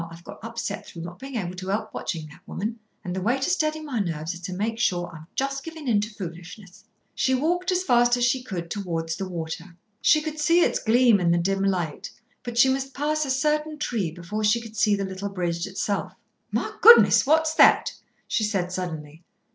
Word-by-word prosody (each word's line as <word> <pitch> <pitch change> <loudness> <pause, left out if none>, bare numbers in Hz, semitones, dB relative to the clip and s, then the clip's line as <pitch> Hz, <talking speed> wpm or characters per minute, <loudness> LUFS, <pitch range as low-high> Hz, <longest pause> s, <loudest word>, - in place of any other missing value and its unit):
I've 165 +1 -12
got - - -11
upset 230 -3 -5
through 165 - -8
not 175 +1 -9
being 270 0 -8
able 180 -6 -3
to 185 0 -7
help 215 +2 -2
watching 160 -3 -4
that 150 - -16
woman, 220 +4 -4 0.2
and 180 0 -4
the 190 - -2
way 240 +7 +1
to 270 - -1
steady 310 -3 0
my 280 -7 -3
nerves 165 -3 -2
is 175 - -9
to 180 +1 -6
make 220 +4 -2
sure 175 -6 0
I'm 160 0 -11
just 275 0 -2
giving 320 -3 -8
in 215 -4 +3
to 210 - -3
foolishness." 180 0 -10 0.3
She 260 0 +1
walked 350 +7 0
as 365 0 +1
fast 240 -5 +4
as 240 - +2
she 250 +1 +1
could 175 -8 -6
towards 165 -5 -3
the 190 +2 -5
water. 170 0 -6 0.2
She 305 - +5
could 310 0 -5
see 335 +3 +4
its - - +2
gleam 235 -1 +4
in 175 -2 +1
the 170 - +3
dim 195 +3 0
light, 180 -6 -1 0.3
but 240 -1 -6
she 265 - +7
must 270 0 -1
pass 300 +2 0
a - - -5
certain 300 +3 0
tree 225 - -1
before 175 +6 -5
she 215 +3 +3
could 225 -2 -11
see 210 -1 +3
the 200 -1 -2
little 190 +1 -5
bridge 175 -3 -2
itself. 195 +1 -2 0.4
"My - - -2
goodness! 465 - +8
What's 315 +1 +3
that?" - - +5 0.3
she 225 - 0
said 195 -4 -1
suddenly. 160 -4 -5
210 Hz, 215 wpm, -25 LUFS, 175-265 Hz, 0.4 s, goodness